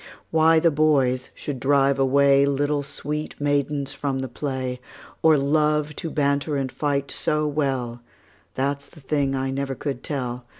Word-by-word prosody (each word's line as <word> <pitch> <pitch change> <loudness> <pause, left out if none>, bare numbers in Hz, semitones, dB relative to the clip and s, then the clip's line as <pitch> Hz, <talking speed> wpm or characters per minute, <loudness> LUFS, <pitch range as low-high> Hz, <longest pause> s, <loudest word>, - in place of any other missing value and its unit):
Why 160 0 +5
the 165 0 +3
boys 135 -4 +2
should 140 -3 -5
drive 140 +1 +3
away 140 +1 +4
Little 145 +1 0
sweet 150 +2 -5
maidens 145 -1 0
from 140 -2 -2
the 130 0 -3
play, 130 -1 -4 0.4
Or 160 -1 +5
love 150 +1 +1
to 165 - -3
banter 140 0 0
and 135 -2 -2
fight 140 +1 -1
so 150 0 0
well, 135 -5 -2 0.5
That 140 +2 -1
's - - -10
the 165 - -16
thing 140 -1 0
I 135 0 -1
never 135 0 -3
could 135 -1 -4
tell. 125 -4 -4
140 Hz, 160 wpm, -24 LUFS, 135-150 Hz, 0.5 s, Why